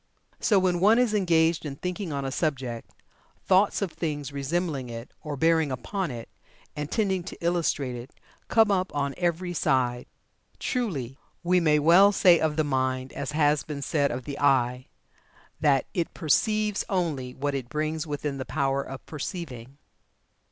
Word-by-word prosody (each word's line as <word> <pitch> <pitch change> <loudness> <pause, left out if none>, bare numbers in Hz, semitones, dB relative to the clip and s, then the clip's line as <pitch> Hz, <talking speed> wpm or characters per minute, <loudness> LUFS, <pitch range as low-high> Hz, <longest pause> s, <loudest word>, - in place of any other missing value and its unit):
So 210 - +3
when 185 -2 +2
one 210 +5 +5
is 245 -3 +2
engaged 170 -5 +2
in 145 -3 -5
thinking 180 +3 -4
on 140 -1 -3
a 135 - -2
subject, 130 -6 -2 0.6
thoughts 195 +2 +3
of 190 - -3
things 145 -4 -4
resembling 140 -2 -2
it, 115 +1 -8
or 150 -2 -5
bearing 160 -1 +3
upon 175 - -3
it, 120 -3 -7 0.5
and 150 0 -4
tending 195 -4 0
to - - -8
illustrate 165 -7 0
it, 120 +2 -8 0.4
come 220 -2 +4
up 185 -1 0
on 140 -1 -1
every 175 0 -1
side. 125 -6 0 0.5
Truly, 145 - -3 0.2
we 180 +1 +3
may 155 -3 +3
well 175 +7 +6
say 180 -4 +5
of 155 -1 0
the 155 - +2
mind, 130 -2 -1
as 140 +1 -4
has 150 -1 +3
been 145 -2 -6
said 145 -2 +1
of 125 +1 -4
the 140 +2 -6
eye, 130 -2 +2 0.7
that 145 -4 +3
'it 170 -2 -2
perceives 210 +6 +1
only 150 -10 -2
what 145 +1 -2
it 130 -3 -4
brings 155 +2 -2
within 145 -1 -3
the - - -2
power 135 +1 0
of 135 -1 -9
perceiving.'" 140 -5 -6
150 Hz, 165 wpm, -26 LUFS, 135-175 Hz, 0.7 s, well